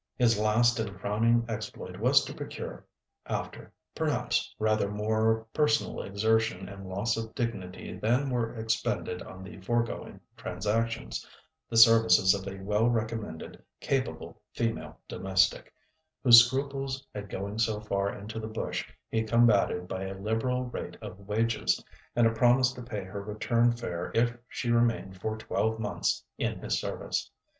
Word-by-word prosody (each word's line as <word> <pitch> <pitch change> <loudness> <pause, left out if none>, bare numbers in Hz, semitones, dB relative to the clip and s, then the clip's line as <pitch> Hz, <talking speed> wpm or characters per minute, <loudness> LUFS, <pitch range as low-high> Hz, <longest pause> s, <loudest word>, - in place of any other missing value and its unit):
His 115 -4 +3
last 115 +3 +3
and 100 -3 -3
crowning 115 +4 +2
exploit 110 -2 -6
was - - +5
to - - -6
procure, - - -7 0.4
after, - - -5 0.2
perhaps, - - -1
rather 110 -2 +1
more 110 +2 +1
personal 150 -1 +1
exertion 110 -1 0
and 95 -1 -9
loss 105 +5 0
of 110 0 -5
dignity 100 -8 -4
than 125 +7 +1
were 120 -2 -1
expended 110 -4 -1
on 95 0 -9
the 95 0 -10
foregoing 115 +4 -2 0.2
transactions, 105 - -2 0.5
the 115 - -1
services 115 -5 +7
of 100 -1 -4
a 95 0 -6
well 105 +4 +2
recommended, 110 -7 -3 0.2
capable - - -2
female 115 -1 -2
domestic, 95 0 +1 0.5
whose 120 -3 +11
scruples 135 +1 -3
at 100 -1 -6
going 100 +3 -4
so 110 -2 +1
far 100 -1 -1
into 110 +2 -7
the 110 - -5
bush 110 0 -3 0.2
he 110 - 0
combated 110 -5 +3
by 95 +1 -4
a 95 0 -5
liberal 115 +5 0
rate 125 - -6
of - - -9
wages, 115 +2 +1 0.3
and 120 - +4
a 115 - +4
promise 125 +2 +4
to 125 - -9
pay 110 -4 -5
her 95 +2 -6
return 115 +3 +1
fare 90 -8 -4
if 120 +1 +2
she 120 - -2
remained 115 -6 +1
for 110 +2 -2
twelve 110 0 -1
months 105 -2 -1
in - - -1
his - - -1
service. - - -3
110 Hz, 150 wpm, -29 LUFS, 100-115 Hz, 0.5 s, whose